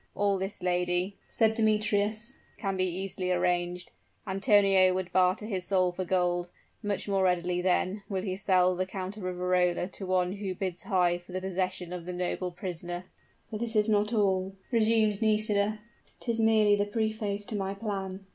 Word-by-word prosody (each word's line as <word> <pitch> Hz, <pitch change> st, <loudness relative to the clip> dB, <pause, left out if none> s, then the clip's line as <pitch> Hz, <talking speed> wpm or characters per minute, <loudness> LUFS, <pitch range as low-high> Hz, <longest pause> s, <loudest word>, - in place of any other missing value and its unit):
"All 200 Hz, -1 st, +1 dB
this, 190 Hz, 0 st, -3 dB
lady," 180 Hz, +1 st, 0 dB
said 220 Hz, -1 st, +2 dB
Demetrius, 215 Hz, +1 st, +1 dB, 0.2 s
"can 195 Hz, -3 st, -2 dB
be 185 Hz, 0 st, +1 dB
easily 185 Hz, 0 st, -2 dB
arranged. 180 Hz, 0 st, 0 dB, 0.3 s
Antonio 195 Hz, -2 st, +4 dB
would 185 Hz, -1 st, -3 dB
barter 185 Hz, +3 st, +2 dB
his 190 Hz, -4 st, -3 dB
soul 185 Hz, -2 st, +2 dB
for 185 Hz, +1 st, -4 dB
gold; 175 Hz, -1 st, 0 dB, 0.3 s
much 205 Hz, -2 st, -2 dB
more 195 Hz, -1 st, +1 dB
readily, 180 Hz, -1 st, +1 dB
then, 185 Hz, +2 st, +1 dB
will 190 Hz, -2 st, -2 dB
he 185 Hz, -2 st, -2 dB
sell 185 Hz, -2 st, +3 dB
the 185 Hz, +1 st, -1 dB
Count 190 Hz, 0 st, -5 dB
of -, -, -8 dB
Riverola 180 Hz, -1 st, +1 dB
to 195 Hz, -, -8 dB
one 185 Hz, -1 st, +1 dB
who 195 Hz, -2 st, -4 dB
bids 180 Hz, -2 st, -4 dB
high 175 Hz, -2 st, +1 dB
for 175 Hz, +1 st, -14 dB
the 185 Hz, -, -1 dB
possession 185 Hz, -1 st, -3 dB
of 175 Hz, -2 st, -6 dB
the 180 Hz, -, -3 dB
noble 180 Hz, +1 st, -2 dB
prisoner." 175 Hz, 0 st, -5 dB, 0.5 s
"But 215 Hz, -, -4 dB
this 230 Hz, -1 st, -4 dB
is 210 Hz, 0 st, +3 dB
not 210 Hz, 0 st, +2 dB
all," 195 Hz, -3 st, +1 dB, 0.2 s
resumed 220 Hz, -2 st, +3 dB
Nisida, 215 Hz, -1 st, +2 dB, 0.4 s
"'tis 230 Hz, -2 st, -2 dB
merely 220 Hz, -2 st, +5 dB
the 205 Hz, 0 st, +1 dB
preface 215 Hz, -1 st, -2 dB
to 215 Hz, -, -3 dB
my 195 Hz, -1 st, -2 dB
plan. 195 Hz, -2 st, -4 dB
190 Hz, 175 wpm, -29 LUFS, 180-210 Hz, 0.5 s, merely